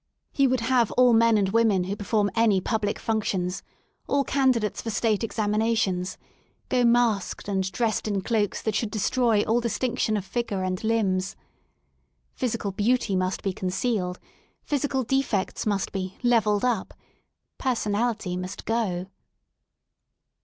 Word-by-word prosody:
He 275 -1 +3
would 255 -2 +1
have 240 -1 +2
all 250 -1 +5
men 230 -1 +5
and 195 -2 +1
women 215 -3 +3
who 190 +3 -3
perform 205 0 0
any 225 -4 +3
public 210 +1 -1
functions, 195 -5 -1 0.5
all 280 0 +2
candidates 255 -7 +1
for 230 - -5
State 220 0 0
examinations, 210 -4 0 0.5
go 250 -1 +2
masked 235 -6 +2
and 190 -2 -1
dressed 220 +3 -1
in 200 -2 -1
cloaks 210 -1 -1
that 220 - 0
should 220 +1 -1
destroy 220 0 +1
all 230 +2 +2
distinction 230 -1 0
of 200 - -4
figure 200 -2 -2
and 185 +1 -2
limbs. 195 -4 0 1.0
Physical 230 -5 -2
beauty 210 +1 +1
must 185 0 -1
be 195 - -1
concealed, 185 0 -2 0.4
physical 280 -2 -1
defects 240 -6 -1
must 200 -2 0
be 190 -1 -4
'* - - -28
levelled 220 -3 +3
up; 235 -6 -1 0.6
personality 220 -5 -1
must 185 0 -6
go. 205 -6 -1
215 Hz, 140 wpm, -25 LUFS, 195-235 Hz, 1.0 s, all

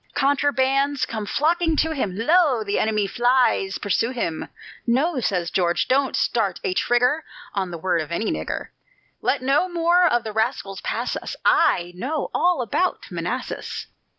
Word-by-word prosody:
Contrabands 275 0 +2
come 215 -2 -4
flocking 325 +4 +1
to 320 +1 +1
him: 210 -11 -2
"Lo! 285 -1 +3
the 200 -1 -1
enemy 215 -2 +1
flies 240 -3 +2
pursue 205 +3 0
him!" 230 -11 -3 0.4
"No," 270 +5 +2
says 180 -7 -1
George, 175 -2 +1
"don't 270 +1 +2
start 205 -6 0
a 185 - 0
trigger 250 +9 +2 0.3
On 190 -2 -1
the 170 - -6
word 170 0 0
of 155 - -7
any 215 +6 -1
nigger; - - -4 0.5
Let 275 - 0
no 275 +8 +2
more 345 +1 +3
of 240 -7 +2
the 220 - -5
rascals 220 -3 -2
pass - - -2
us, - - -5
I 175 0 +3
know 275 - -3
all 350 -7 +2
about 355 - -1
Manassas." - - -4
245 Hz, 155 wpm, -23 LUFS, 200-290 Hz, 0.5 s, Lo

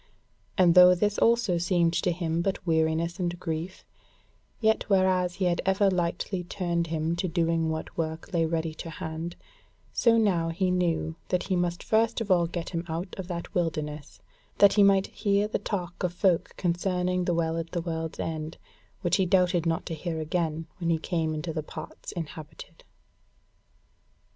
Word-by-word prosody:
And 180 -3 +6
though 180 0 +8
this 205 +3 0
also 230 -7 +3
seemed 175 -1 +2
to 180 +1 +1
him 165 -1 -1
but 190 +1 -2
weariness 165 +1 +1
and 175 -1 -2
grief, 170 +1 -5 0.7
yet 220 -1 +1
whereas 185 -2 +2
he 190 - -1
had 175 -1 +1
ever 195 +1 +3
lightly 180 +1 -1
turned 170 -2 -2
him 160 +1 -1
to 185 - -1
doing 165 -1 +1
what 160 0 -4
work 160 +3 -4
lay 165 -2 +2
ready 160 -1 -1
to 165 - -7
hand; 160 +2 -5 0.6
so 230 -1 +4
now 180 -7 +2
he 180 +2 0
knew 170 -3 0
that 180 - 0
he 190 - -1
must 175 -1 -1
first 225 +1 +2
of 215 -3 -2
all 175 -2 +4
get 170 0 -5
him 170 -2 -2
out 170 +4 -4
of 185 - -5
that 170 -2 -5
wilderness, 155 -4 -3 0.4
that 200 -1 +7
he 205 - +4
might 195 -1 +5
hear 205 -1 0
the 215 - -2
talk 180 -5 -4
of 180 -1 -1
folk 180 -1 +1
concerning 180 0 0
the 175 - +1
Well 165 -1 0
at 165 0 -4
the 170 - -2
World's 165 -1 -4
End, 160 0 -4 0.4
which 175 - +2
he 190 -2 +2
doubted 180 -2 +3
not 165 0 0
to - - -4
hear 160 +1 -4
again 160 0 -1
when 170 -2 -1
he 165 - +3
came 160 -1 -1
into 160 +2 -4
the 155 - -2
parts 155 +1 -8
inhabited. 160 0 -8
170 Hz, 175 wpm, -27 LUFS, 165-185 Hz, 0.7 s, though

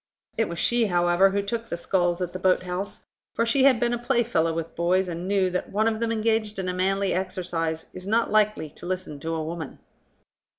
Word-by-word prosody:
It 225 - 0
was 170 - -5
she, 235 +5 +2
however, 175 +1 +4
who 200 +1 -1
took 230 +3 -4
the 170 - -3
sculls 175 0 0
at 175 - -5
the 185 - -5
boat 185 0 +3
house, 180 +2 -5 0.3
for 230 - +2
she 260 +3 +3
had 260 -4 +5
been 240 0 +1
a 240 - -1
playfellow 240 -9 +1
with 165 0 -4
boys, 180 +2 +2
and 175 +1 -5
knew 195 -2 +2
that 180 - -3
one 215 +2 +2
of 220 -1 0
them 230 0 0
engaged 220 -1 0
in 190 -1 -2
a 180 - -1
manly 195 +1 +1
exercise 175 -4 -2
is 185 +1 -9
not 230 +3 +2
likely 210 -8 +2
to - - -10
listen 185 -5 -4
to 165 +2 -3
a 160 - -2
woman. 160 -2 -6
185 Hz, 220 wpm, -25 LUFS, 175-220 Hz, 0.3 s, had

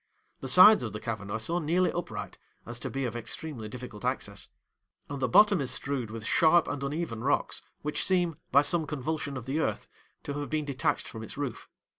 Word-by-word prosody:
The 135 - -6
sides 185 +10 +8
of 110 - -4
the 105 - -4
cavern 105 -3 -5
are 110 - -1
so 165 +11 -1
nearly 175 +3 +2
upright, 175 - -5 0.3
as 120 +1 -5
to - - -4
be 135 -1 -2
of 120 -1 -3
extremely 120 -1 -4
difficult 125 -3 -8
access; - - -2 0.6
and 140 - -4
the 130 - +2
bottom 205 - +6
is 130 - -2
strewed 130 -3 -1
with 110 0 -7
sharp 165 +7 +4
and 145 -1 -3
uneven 140 -5 -3
rocks, 140 +2 +1 0.2
which 150 0 -1
seem, 175 -4 +2
by 140 +2 +6
some 160 +1 +1
convulsion 145 -1 -3
of 120 - -7
the 140 +4 -1
earth, - - -1 0.4
to 145 - -4
have 145 - -4
been 155 -1 -1
detached 145 +2 -1
from 110 - -7
its 110 - -8
roof. 135 -5 -4
140 Hz, 205 wpm, -29 LUFS, 120-160 Hz, 0.6 s, sides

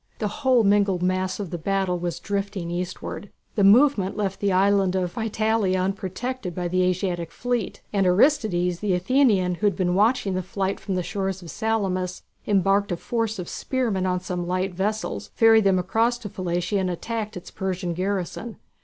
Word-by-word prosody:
The 215 - -1
whole 260 -4 +4
mingled 200 -3 +3
mass 185 +1 0
of 195 -5 -5
the 175 - -4
battle 190 0 0
was 175 -1 -3
drifting 200 -3 -3
eastward. 180 +3 -5 0.2
The 205 - +1
movement 205 -2 +5
left 195 -2 -2
the 200 -1 +1
island 195 0 +3
of 180 -2 -1
Psytalia 220 -4 0
unprotected 195 +2 -3
by 180 -1 -2
the 185 +1 +1
Asiatic 180 -2 -1
fleet, 245 -4 -3
and 195 -2 +2
Aristides, 180 - +2
the 200 -3 +1
Athenian, 195 -2 +3
who 210 - +4
had 200 - +1
been 180 -1 0
watching 210 0 +2
the 185 - -1
fight 190 +1 -2
from 195 - -3
the 180 - -1
shore 190 +2 -2
of 190 - -2
Salamis, 185 0 -2 0.2
embarked 200 0 +2
a 175 - -1
force 225 +1 -2
of 180 - -5
spearmen 225 -8 -1
on 180 0 0
some 180 -1 -4
light 185 +1 -1
vessels, 210 +4 -2
ferried 225 -2 +5
them 190 -1 +4
across 225 +7 +1
to 220 -4 -8
Psytalia 180 +2 -1
and 185 -1 0
attacked 215 +3 -4
its 175 - -10
Persian 185 -2 -3
garrison. 195 +4 -3
195 Hz, 180 wpm, -24 LUFS, 180-215 Hz, 0.2 s, movement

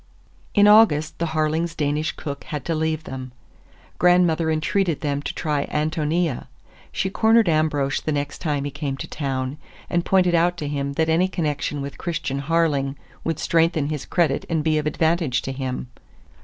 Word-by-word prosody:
In 205 -1 +6
August 210 -8 +5
the 170 - 0
Harlings' 160 +2 0
Danish 150 +1 0
cook 140 -2 -7
had 150 -4 -5
to 165 - 0
leave 160 0 -1
them. 130 -3 -7 0.7
Grandmother 175 -2 +4
entreated 160 +1 0
them 145 -1 -1
to - - -3
try 150 -3 -2
Ántonia. 155 0 -1 0.4
She 190 - -1
cornered 225 0 +4
Ambrosch 155 -4 +1
the 155 - -2
next 145 -1 -3
time 145 -4 -1
he 145 - -3
came 140 -1 -4
to - - -6
town, 135 -1 -3 0.3
and 175 0 +1
pointed 180 -2 +3
out 175 +1 +3
to 150 - -4
him 140 -1 -2
that 160 +3 +1
any 165 +3 +3
connection 150 -5 -2
with 140 - -7
Christian 155 -6 -2
Harling 145 -3 +1 0.3
would 165 -2 -1
strengthen 165 -3 +1
his 150 -3 -4
credit 170 -6 +1
and 160 -3 0
be 155 -1 +2
of 150 - -2
advantage 160 -4 +1
to 135 - -3
him. 130 -1 -4
155 Hz, 170 wpm, -23 LUFS, 145-170 Hz, 0.7 s, In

